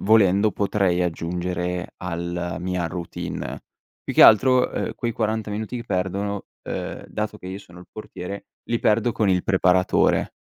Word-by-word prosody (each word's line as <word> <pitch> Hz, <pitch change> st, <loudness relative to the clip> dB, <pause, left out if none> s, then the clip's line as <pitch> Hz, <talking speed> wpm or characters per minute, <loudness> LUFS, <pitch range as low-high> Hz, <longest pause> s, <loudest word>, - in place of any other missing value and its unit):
volendo 100 Hz, -1 st, +4 dB
potrei 100 Hz, -3 st, +1 dB
aggiungere 90 Hz, +1 st, -2 dB
alla 85 Hz, 0 st, -3 dB
mia 90 Hz, -1 st, -2 dB
routine. 85 Hz, 0 st, -5 dB, 0.4 s
Più -, -, -5 dB
che -, -, +7 dB
altro, 125 Hz, +3 st, +6 dB
uhm, -, -, -3 dB
quei 120 Hz, -1 st, -2 dB
40 110 Hz, -1 st, -1 dB
minuti 110 Hz, +3 st, -4 dB
che 120 Hz, -, -6 dB
perdono 100 Hz, +1 st, -2 dB, 0.2 s
uhm, -, -, -5 dB
dato 105 Hz, 0 st, -3 dB
che 90 Hz, -, -11 dB
io 95 Hz, +1 st, -5 dB
sono 90 Hz, -3 st, -15 dB
il -, -, -15 dB
portiere, 100 Hz, -2 st, -7 dB, 0.2 s
li 120 Hz, -, +2 dB
perdo 115 Hz, +2 st, +2 dB
con 105 Hz, -3 st, +1 dB
il 90 Hz, -1 st, +2 dB
preparatore, 90 Hz, -1 st, +3 dB
95 Hz, 155 wpm, -23 LUFS, 90-110 Hz, 0.4 s, che